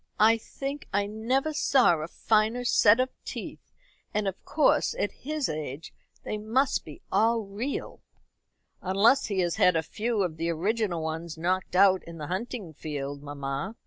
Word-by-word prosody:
"I 225 +2 +5
think 275 +5 -6
I 200 +1 +1
never 250 +8 -1
saw 260 - +4
a 155 - -4
finer 220 +6 +1
set 225 -1 +5
of 255 0 +1
teeth, - - -8 0.4
and 210 -1 +1
of 190 -1 -4
course 310 +8 +2
at - - 0
his 300 -1 -3
age 150 -1 -5 0.3
they 215 - -3
must 235 +6 +1 0.3
all 230 0 +3
be 195 - -16
real." 245 +8 -4 0.8
"Unless 200 +8 +3
he 195 -3 0
has 175 -1 -1
had 180 -1 +5
a 160 - +1
few 215 +5 -1
of 165 -4 -3
the 165 +1 -1
original 180 0 -1
ones 160 +1 -4
knocked 180 +3 -1
out 190 0 +5
in 170 0 -9
the 150 - -5
hunting 205 -4 -5
field, 145 -2 -5
mamma. 145 +6 -4
200 Hz, 165 wpm, -27 LUFS, 165-230 Hz, 0.8 s, I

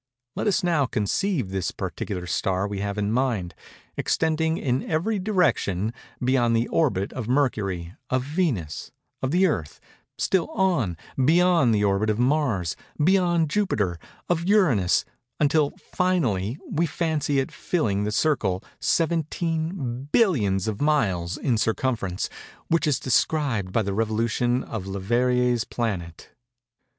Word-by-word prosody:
Let - - -1
us 200 - +2
now 165 -6 +2
conceive 125 - -1
the 95 -2 -1
particular 90 -3 -4
star 95 +2 0
we 100 -1 -4
have 100 +1 -3
in 105 0 0
mind, 115 -8 0 0.4
extending, 160 0 +1
in 130 -1 0
every 185 +7 0
direction, 160 - +1 0.3
beyond 125 -2 +2
the 115 +1 +1
orbit 115 - +1
of 120 -4 -5
Mercury—of 120 -2 -1
Venus—of 130 - -3
the 180 +6 +3
Earth:—still 160 - -2
on, 140 - +1 0.3
beyond 165 -5 +4
the 105 - +1
orbit 100 +2 +2
of 105 - +1
Mars—of 150 - +1
Jupiter—of 160 - -2
Uranus—until, 145 - +2 0.2
finally, 130 - 0
we 165 +2 0
fancy 155 -2 -1
it 135 - 0
filling 105 - -1
the 105 - -1
circle—17 155 - -1
billions 110 - +2
of 105 -2 -3
miles 95 - +1
in 120 -6 0
circumference—which 115 - -2
is 145 - +2
described 130 -7 +1
by 110 +2 +1
the 100 -1 -2
revolution 115 +3 0
of 100 -4 -6
Leverrier's 120 +5 +1
planet. 95 -10 -4
125 Hz, 115 wpm, -25 LUFS, 100-160 Hz, 0.4 s, beyond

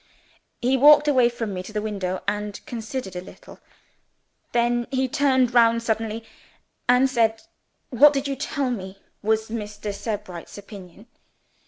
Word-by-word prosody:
He 260 +2 +3
walked 295 +2 +7
away 255 -5 +4
from 230 -4 -4
me 180 - -4
to 185 - -10
the 215 - -2
window, 195 -4 -3
and 205 0 -2
considered 225 -3 -5
a 180 - -4
little. 185 - -14 0.9
Then 240 0 +1
he 265 -1 0
turned 260 -3 +2
round 230 -1 +4
suddenly 225 0 -2 0.7
and 250 +2 +5
said 225 -4 +1 0.5
'What 280 +4 +7
did 280 -1 -2
you 275 - -2
tell 275 -1 -2
me 190 -4 -6 0.2
was 220 +1 0
Mr. 210 -2 -5
Sebright's 200 -5 -6
opinion? 200 -1 -12
230 Hz, 145 wpm, -24 LUFS, 210-255 Hz, 0.9 s, walked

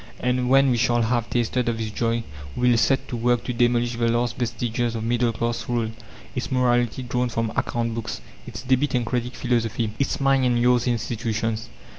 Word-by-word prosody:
And 125 0 0
when 135 0 +5
we 120 - +2
shall 120 0 +2
have 120 0 0
tasted 120 +1 0
of 115 - -1
this 110 -1 -3
joy, 115 +1 0 0.3
we 125 0 +3
will 120 - +4
set 135 +2 +2
to - - -3
work 120 +1 +1
to 125 - -3
demolish 120 0 +1
the 115 0 +1
last 120 +1 +1
vestiges 120 0 -2
of 110 - -3
middle 120 +1 +1
class 115 +2 -3
rule: 115 -2 0 0.4
its 125 - -4
morality 120 -1 +1
drawn 125 0 -1
from 115 -1 -1
account 115 -1 -1
books, 115 -1 -4 0.3
its - - -7
'debit 130 +1 +1
and 120 -1 +1
credit' 125 +1 -2
philosophy, 115 -3 0
its 140 - 0
'mine 135 -1 +3
and 125 -1 +2
yours' 125 0 +3
institutions. 115 -1 -2
120 Hz, 195 wpm, -24 LUFS, 115-125 Hz, 0.4 s, when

